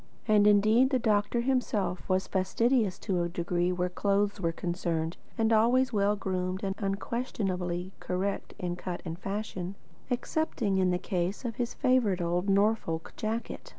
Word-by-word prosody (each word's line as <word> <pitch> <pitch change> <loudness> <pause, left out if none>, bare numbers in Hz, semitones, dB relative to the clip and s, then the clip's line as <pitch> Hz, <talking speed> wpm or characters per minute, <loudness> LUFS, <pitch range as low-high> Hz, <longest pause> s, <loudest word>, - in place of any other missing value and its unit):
And 210 -1 +5
indeed 215 +5 +5
the 265 - +2
doctor 215 0 +1
himself 215 -9 -1
was 190 0 +2
fastidious 210 +2 +1
to 185 -4 -1
a 170 - -1
degree 175 +1 0
where 180 0 0
clothes 200 +2 0
were 165 -2 +1
concerned, 170 -1 -2 0.2
and 225 0 +3
always 245 +3 +4
well 205 0 +3
groomed 185 -1 -2
and 195 -1 0
unquestionably 195 -4 -2
correct 190 +2 -3
in 180 -3 -3
cut 180 -1 -5
and 165 0 -5
fashion, 195 -2 -4 0.3
excepting 245 -5 0
in 185 -1 +3
the 180 - +2
case 180 +5 -2
of 230 -3 -3
his 240 -1 -2
favourite 255 -8 +2
old 175 +3 0
Norfolk 200 -5 +1
jacket. 220 +2 -4
195 Hz, 150 wpm, -29 LUFS, 180-220 Hz, 0.3 s, And